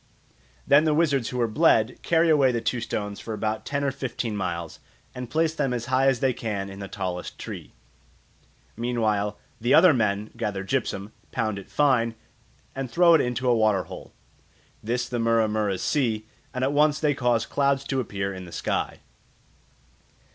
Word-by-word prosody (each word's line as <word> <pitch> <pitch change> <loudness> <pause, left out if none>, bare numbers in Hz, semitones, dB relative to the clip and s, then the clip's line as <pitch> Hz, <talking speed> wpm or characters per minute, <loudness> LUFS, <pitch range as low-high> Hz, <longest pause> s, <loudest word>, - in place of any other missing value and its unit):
Then 145 +3 +5
the 155 -1 +2
wizards 140 -7 +2
who 125 - -4
were 120 -1 +2
bled 110 +2 +3
carry 165 -1 +3
away 140 -4 +4
the 120 - -1
two 120 +1 -1
stones 105 -3 -4
for 110 - -5
about 110 +1 -3
ten 140 0 -1
or 140 - +1
fifteen 125 -4 -4
miles, 85 -4 -4 0.3
and 125 -1 -6
place 160 +2 +1
them 140 -5 -1
as 120 -1 -3
high 135 +1 +4
as 130 -3 +2
they 135 -2 +2
can 100 -4 -4
in 95 - -9
the 100 - -6
tallest 90 -4 -5
tree. - - -8 1.0
Meanwhile 110 -4 0 0.2
the 120 +3 +4
other 165 0 +7
men 105 -3 0
gather 105 -4 -3
gypsum, 105 -3 -2 0.2
pound 110 -4 -1
it 100 - -13
fine, 125 -6 +2 0.6
and 135 -1 -4
throw 170 +4 +5
it 160 - +6
into 125 +1 -2
a 120 - +4
water 110 -4 +2
hole. - - -10 0.7
This 120 +3 -1
the 120 - -3
Mura 115 -1 +3
muras 105 -3 -1
see, 115 -7 0 0.3
and 125 - -3
at 135 +2 +1
once 150 0 +3
they 150 -2 +2
cause 120 -3 +1
clouds 140 -1 +1
to 135 -1 -2
appear 100 -5 -3
in 95 -1 -8
the 85 - -11
sky. - - -2
120 Hz, 180 wpm, -25 LUFS, 105-135 Hz, 1.0 s, other